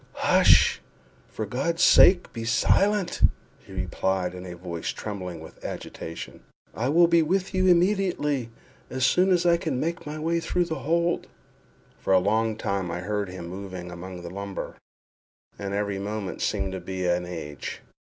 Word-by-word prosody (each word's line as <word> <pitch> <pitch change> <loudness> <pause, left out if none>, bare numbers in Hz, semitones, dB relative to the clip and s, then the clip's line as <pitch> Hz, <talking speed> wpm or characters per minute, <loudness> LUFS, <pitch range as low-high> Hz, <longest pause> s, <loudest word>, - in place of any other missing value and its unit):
"Hush! - - +5 0.5
for 110 - -4
God's 140 +10 -1
sake 180 -1 +6
be 115 - -5
silent!" 190 - +2 0.4
he - - -17
replied, 95 -2 -1
in 90 0 -8
a 90 - -7
voice 85 -1 -6
trembling 90 -6 -5
with 80 - -13
agitation; 80 - -7 0.3
"I 125 +4 -1
will 170 +4 +6
be 170 0 +4
with 185 +5 0
you 185 0 +2
immediately—as 150 - 0
soon 180 +7 +4
as 180 -2 +3
I 170 -1 +5
can 155 -6 -2
make 165 +1 -3
my 150 +1 -5
way 165 +2 0
through 175 +2 0
the 160 -4 -4
hold." 170 +4 0 0.7
For 95 - +1
a - - +7
long 110 +3 +1
time 100 -5 -2
I 85 +1 -3
heard 105 0 -2
him 90 -2 -7
moving 95 -1 -7
among 90 +1 -8
the 85 - -7
lumber, 100 0 -5 0.9
and 100 -1 -4
every 100 -1 -1
moment 100 -1 -4
seemed 95 -2 -1
to 95 - -4
me 95 -1 -4
an 90 0 +1
age. 75 -5 -6
105 Hz, 160 wpm, -26 LUFS, -, 0.9 s, a